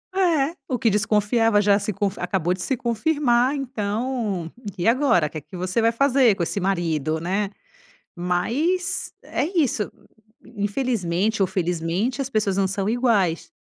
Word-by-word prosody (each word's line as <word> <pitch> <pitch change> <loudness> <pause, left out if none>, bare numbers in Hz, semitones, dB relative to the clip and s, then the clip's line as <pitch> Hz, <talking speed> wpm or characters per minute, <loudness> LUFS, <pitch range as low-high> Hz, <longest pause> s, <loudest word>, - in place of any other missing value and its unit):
É 335 -5 +2
o 255 - 0
que 225 - +3
desconfiava 210 +1 +2
já 200 -1 +4
se 210 - -2
confi 200 +1 -2
acabou 180 -1 0
de 185 - -6
se 265 - 0
confirmar, 245 +2 +1
então, 220 - -2 0.3
e 180 +4 -1
agora 230 - +3
que 155 - -7
que 185 - -13
você 185 +6 -1
vai 230 - +4
fazer, 255 -3 +3
com 175 - -2
esse 200 - -2
marido, 165 -5 0
né. 195 +4 -1 0.7
Mas 245 - -1
é - - -1
isso, 240 -9 +1 0.7
infelizmente 205 -2 0
ou 190 - +4
felizmente 180 +8 -1
as 270 - -3
pessoas 205 -5 0
não 195 -1 +2
são 195 +1 -2
iguais. 220 -8 +1
210 Hz, 150 wpm, -23 LUFS, 185-250 Hz, 0.7 s, já